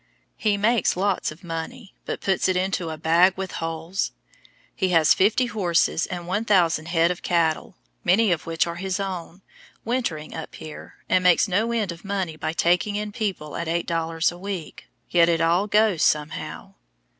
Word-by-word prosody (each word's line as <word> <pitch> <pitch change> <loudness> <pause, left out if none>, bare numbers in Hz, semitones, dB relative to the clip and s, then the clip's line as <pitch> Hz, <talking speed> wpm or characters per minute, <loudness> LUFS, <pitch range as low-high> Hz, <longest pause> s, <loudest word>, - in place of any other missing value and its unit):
He 210 -2 +1
makes 215 -2 +2
lots 195 -2 0
of 160 +5 -14
money, 175 +7 -6
but - - -4
puts 190 -1 +1
it 185 - +1
into 185 -2 -1
"a 160 - -5
bag 170 +4 +4
with 190 -1 -4
holes." 165 +3 -3 0.6
He 190 - 0
has 165 -4 +5
fifty 215 +6 +3
horses 180 -6 +1
and 175 -2 -5
1,000 180 -5 +2
head 170 0 +3
of 180 - -5
cattle, 170 +1 0 0.3
many 195 +3 +4
of 170 -2 -1
which 165 -1 +1
are 170 0 -5
his 190 +1 -2
own, 185 -1 -5 0.4
wintering 225 -11 -2
up 160 - -7
here, 155 -1 -10
and 185 - +2
makes 180 +3 +5
no 210 +5 +1
end 220 -5 0
of 170 0 -10
money 195 -5 -2
by 155 - -3
taking 180 +5 +1
in 210 0 -3
people 195 -9 -4
at 170 - -3
eight 170 +1 -1
dollars 165 0 0
a 175 - -11
week, 190 -5 -6 0.2
yet 170 -1 +5
it 165 -1 +2
all 170 +5 +2
goes 210 -5 +3
somehow. 150 0 -1
180 Hz, 180 wpm, -24 LUFS, 165-200 Hz, 0.6 s, has